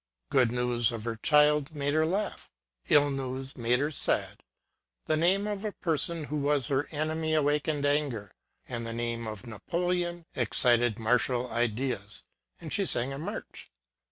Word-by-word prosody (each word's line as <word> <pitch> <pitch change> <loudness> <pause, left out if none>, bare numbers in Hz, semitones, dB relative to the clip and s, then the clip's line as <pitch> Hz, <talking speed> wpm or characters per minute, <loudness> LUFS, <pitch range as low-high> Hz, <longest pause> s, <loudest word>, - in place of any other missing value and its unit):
Good 125 -3 +4
news 125 -1 +1
of 115 -2 -5
her 115 0 -3
child 150 +3 +3
made 145 0 -1
her 155 +1 +3
laugh 195 +4 -2 0.4
ŌĆö - - -7
ill 145 -1 +6
news 135 0 -4
made 120 0 +2
her 145 +2 0
sad; - - 0 0.6
the 155 - +2
name 185 +6 +3
of 205 -1 -3
a 210 -2 -3
person 165 0 0
who 150 +1 -3
was 145 -1 +1
her 140 +1 +1
enemy 155 +1 -1
awakened 150 0 +1
anger; 140 -9 0 0.3
and 120 -2 -4
the 115 0 -5
name 115 -1 -3
of 110 +2 -7
Napoleon 175 - -2
excited 120 -1 +2
martial 125 +2 +1
ideas, 120 -3 -1 0.4
and - - -5
she - - +2
sang 125 +3 +1
a 135 - -6
march. 200 +8 -7
140 Hz, 160 wpm, -29 LUFS, 120-155 Hz, 0.6 s, ill